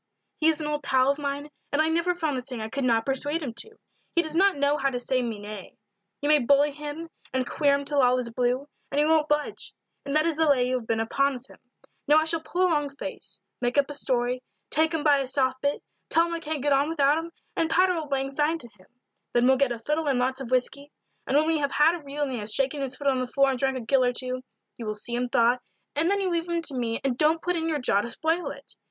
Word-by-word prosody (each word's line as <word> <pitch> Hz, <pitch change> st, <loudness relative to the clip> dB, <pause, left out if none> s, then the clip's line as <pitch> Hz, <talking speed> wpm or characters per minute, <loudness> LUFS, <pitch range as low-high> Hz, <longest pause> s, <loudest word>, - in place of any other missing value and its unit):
"He 315 Hz, -, +3 dB
is 320 Hz, -1 st, +3 dB
an 305 Hz, -, -3 dB
old 295 Hz, 0 st, -2 dB
pal 265 Hz, -1 st, +3 dB
of 280 Hz, -, -4 dB
mine, 285 Hz, +1 st, -4 dB, 0.2 s
and 285 Hz, -, 0 dB
I 310 Hz, -, +4 dB
never 335 Hz, +2 st, +1 dB
found 315 Hz, -5 st, -1 dB
the 255 Hz, -, -2 dB
thing 250 Hz, -2 st, -7 dB
I 220 Hz, 0 st, -4 dB
could 275 Hz, +4 st, -3 dB
not 230 Hz, -2 st, +2 dB
persuade 290 Hz, +4 st, 0 dB
him 250 Hz, -5 st, -4 dB
to. 445 Hz, 0 st, -5 dB, 0.4 s
He 340 Hz, -, +4 dB
does 315 Hz, -1 st, -6 dB
not 390 Hz, -1 st, +4 dB
know 285 Hz, +1 st, +2 dB
how 275 Hz, -1 st, +1 dB
to 250 Hz, -2 st, -3 dB
say 255 Hz, +1 st, 0 dB
me 230 Hz, -3 st, -3 dB
nay 205 Hz, -1 st, -9 dB, 0.4 s
you 290 Hz, -, -1 dB
may 300 Hz, 0 st, +6 dB
bully 285 Hz, +3 st, +4 dB
him 300 Hz, +3 st, -7 dB, 0.2 s
and 260 Hz, -1 st, 0 dB
queer 285 Hz, -2 st, +2 dB
him 280 Hz, 0 st, -3 dB
till 285 Hz, 0 st, +1 dB
all 250 Hz, 0 st, +4 dB
is 235 Hz, -2 st, -3 dB
blue, 250 Hz, +3 st, 0 dB, 0.2 s
and 280 Hz, -, -3 dB
he 295 Hz, -, +4 dB
won't 310 Hz, -1 st, +3 dB
budge, 295 Hz, 0 st, -2 dB, 0.3 s
and 280 Hz, +1 st, -3 dB
that 310 Hz, +1 st, +4 dB
is 330 Hz, -2 st, 0 dB
the 320 Hz, -1 st, +3 dB
lay 250 Hz, -3 st, +3 dB
you 255 Hz, -, -1 dB
have 225 Hz, -, -12 dB
been 225 Hz, -1 st, 0 dB
upon 275 Hz, +5 st, +1 dB
with 255 Hz, 0 st, -9 dB
him. -, -, -17 dB, 0.5 s
Now 295 Hz, -, +6 dB
I 315 Hz, -, +5 dB
shall 320 Hz, 0 st, 0 dB
pull 355 Hz, +3 st, -1 dB
a -, -, +5 dB
long 295 Hz, -2 st, +1 dB
face 275 Hz, -, -7 dB, 0.2 s
make 245 Hz, +2 st, 0 dB
up 285 Hz, 0 st, +3 dB
a -, -, -5 dB
story 250 Hz, -3 st, -1 dB, 0.3 s
take 320 Hz, +2 st, +3 dB
him 320 Hz, -3 st, -1 dB
by 290 Hz, -3 st, +5 dB
his 265 Hz, -1 st, -3 dB
soft 260 Hz, -2 st, +1 dB
bit 285 Hz, 0 st, -1 dB, 0.3 s
tell 330 Hz, +1 st, +4 dB
him 340 Hz, -, -4 dB
I 335 Hz, -, -2 dB
can't 310 Hz, -3 st, -4 dB
get 290 Hz, -1 st, +3 dB
on 280 Hz, +2 st, +2 dB
without 295 Hz, -1 st, +3 dB
him, 335 Hz, +1 st, -7 dB, 0.2 s
and 325 Hz, -, +1 dB
patter 365 Hz, +2 st, +4 dB
old 315 Hz, -4 st, -4 dB
lang 270 Hz, 0 st, -1 dB
syne 300 Hz, +4 st, +1 dB
to 240 Hz, -7 st, -11 dB
him. 190 Hz, -4 st, -23 dB, 0.5 s
Then 240 Hz, 0 st, +3 dB
we'll 265 Hz, +1 st, +5 dB
get 275 Hz, -2 st, +2 dB
a 240 Hz, -, -2 dB
fiddle 300 Hz, +7 st, -2 dB
and 270 Hz, -3 st, +2 dB
lots 260 Hz, +2 st, 0 dB
of 250 Hz, -, -6 dB
whisky; 270 Hz, +3 st, -1 dB, 0.4 s
and 275 Hz, -, +3 dB
when 305 Hz, -, +4 dB
we 320 Hz, -1 st, +2 dB
have 280 Hz, -1 st, -1 dB
had 305 Hz, +3 st, +5 dB
a 345 Hz, -3 st, -6 dB
reel 285 Hz, +1 st, -3 dB
and 275 Hz, -, -2 dB
he 245 Hz, -, -3 dB
has 210 Hz, 0 st, -4 dB
shaken 275 Hz, +3 st, 0 dB
his 265 Hz, -1 st, -3 dB
foot 285 Hz, -, -9 dB
on 270 Hz, -2 st, +3 dB
the 255 Hz, -, -2 dB
floor 275 Hz, +2 st, +3 dB
and 260 Hz, -, -3 dB
drank 265 Hz, 0 st, 0 dB
a -, -, -4 dB
gill 255 Hz, +3 st, +2 dB
or 250 Hz, 0 st, +2 dB
two, 255 Hz, +1 st, -2 dB, 0.4 s
you 230 Hz, -, -6 dB
will 215 Hz, -, -2 dB
see 225 Hz, +3 st, -3 dB
him 245 Hz, +1 st, -1 dB
thaw, 240 Hz, +1 st, +3 dB, 0.4 s
and 320 Hz, +4 st, +2 dB
then 400 Hz, 0 st, +2 dB
you 380 Hz, -2 st, 0 dB
leave 340 Hz, 0 st, -1 dB
him 340 Hz, -1 st, -1 dB
to 295 Hz, -, -3 dB
me 230 Hz, -2 st, -1 dB
and 255 Hz, -3 st, -1 dB
don't 315 Hz, +2 st, +3 dB
put 355 Hz, 0 st, 0 dB
in 325 Hz, -1 st, -1 dB
your 310 Hz, -, 0 dB
jaw 225 Hz, -7 st, +2 dB
to 235 Hz, -, -5 dB
spoil 320 Hz, +5 st, 0 dB
it. 280 Hz, 0 st, -10 dB
280 Hz, 285 wpm, -26 LUFS, 255-310 Hz, 0.5 s, may